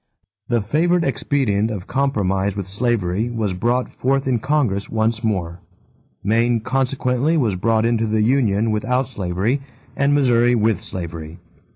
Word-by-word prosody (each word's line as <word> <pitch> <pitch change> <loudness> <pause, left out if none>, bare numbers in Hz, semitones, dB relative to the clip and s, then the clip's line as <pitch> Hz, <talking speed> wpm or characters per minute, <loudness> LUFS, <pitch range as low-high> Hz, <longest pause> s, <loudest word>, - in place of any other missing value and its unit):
The 120 -2 +1
favorite 170 - +2
expedient 115 -6 0
of 100 -5 -5
compromise 100 -8 0
with 100 -2 -4
slavery 105 0 0
was 110 -5 -2
brought 120 +7 0
forth 135 +1 -1
in 125 -3 +1
Congress 125 -7 0
once 110 +1 0
more. 90 -6 -2 0.6
Maine 115 +3 +2
consequently 130 +4 0
was 115 -10 +1
brought 110 +4 +1
into 115 -1 +1
the 110 0 +1
union 110 -3 +2
without 125 +5 0
slavery 105 +3 -1 0.3
and 140 +1 +2
Missouri 120 -3 +3
with 110 -4 +1
slavery. 85 -3 -6
115 Hz, 140 wpm, -20 LUFS, 100-130 Hz, 0.6 s, Missouri